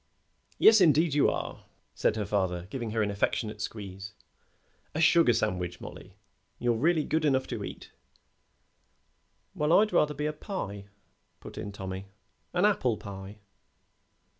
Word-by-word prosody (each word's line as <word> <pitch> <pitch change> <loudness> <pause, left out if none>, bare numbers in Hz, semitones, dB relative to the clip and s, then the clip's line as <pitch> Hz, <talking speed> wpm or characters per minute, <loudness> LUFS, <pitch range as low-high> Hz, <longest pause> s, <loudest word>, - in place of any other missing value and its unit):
"Yes, 220 -2 +7
indeed, 160 -2 +4
you 145 - +4
are," - - -5 0.3
said - - +1
her 105 -2 -2
father, 90 -3 -1
giving 120 -4 -4
her 110 0 0
an 105 - -1
affectionate 105 +1 -1
squeeze. 100 -2 -7 0.8
"A - - -1
sugar 165 -3 +5
sandwich, 90 -6 -1
Mollie. - - -11 0.4
You're 120 -1 +1
really 155 +7 +2
good 160 +1 0
enough 130 -3 +2
to - - -4
eat." - - -8 1.6
"Well, 150 +1 0
I'd 210 +5 +4
rather 150 0 +3
be 150 +2 -3
a 150 - -1
pie," 105 - -6 0.5
put - - -11
in 100 - -5
Tommy; 95 -1 -6 0.4
"an 180 +3 +2
apple 130 - +2
pie." 100 +1 -9
115 Hz, 140 wpm, -29 LUFS, 100-155 Hz, 1.6 s, Yes